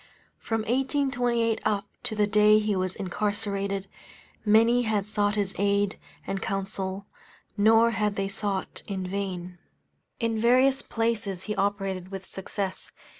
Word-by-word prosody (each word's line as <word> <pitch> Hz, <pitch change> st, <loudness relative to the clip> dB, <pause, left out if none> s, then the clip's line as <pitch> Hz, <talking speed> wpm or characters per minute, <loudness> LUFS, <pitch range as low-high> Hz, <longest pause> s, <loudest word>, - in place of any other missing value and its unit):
From 225 Hz, -1 st, -1 dB
1828 245 Hz, -2 st, +1 dB
up 205 Hz, -2 st, 0 dB, 0.2 s
to 230 Hz, -3 st, -1 dB
the 210 Hz, -1 st, +3 dB
day 210 Hz, 0 st, +5 dB
he 210 Hz, -1 st, +1 dB
was 185 Hz, 0 st, -1 dB
incarcerated, 200 Hz, 0 st, -2 dB, 0.6 s
many 230 Hz, +3 st, +5 dB
had 215 Hz, -4 st, 0 dB
sought 205 Hz, -1 st, +1 dB
his 200 Hz, -2 st, 0 dB
aid 200 Hz, 0 st, +1 dB, 0.3 s
and 195 Hz, 0 st, -3 dB
counsel, 195 Hz, -1 st, -3 dB, 0.5 s
nor 225 Hz, +2 st, +5 dB
had 210 Hz, -2 st, 0 dB
they 195 Hz, 0 st, -1 dB
sought 195 Hz, -1 st, -3 dB
in 190 Hz, -2 st, -3 dB
vain. 180 Hz, -2 st, -4 dB, 0.6 s
In 230 Hz, -2 st, 0 dB
various 255 Hz, +4 st, +4 dB
places 215 Hz, -5 st, -1 dB
he 210 Hz, -, -3 dB
operated 195 Hz, -2 st, -1 dB
with 195 Hz, -1 st, -7 dB
success. 190 Hz, 0 st, -5 dB
205 Hz, 130 wpm, -27 LUFS, 195-225 Hz, 0.6 s, day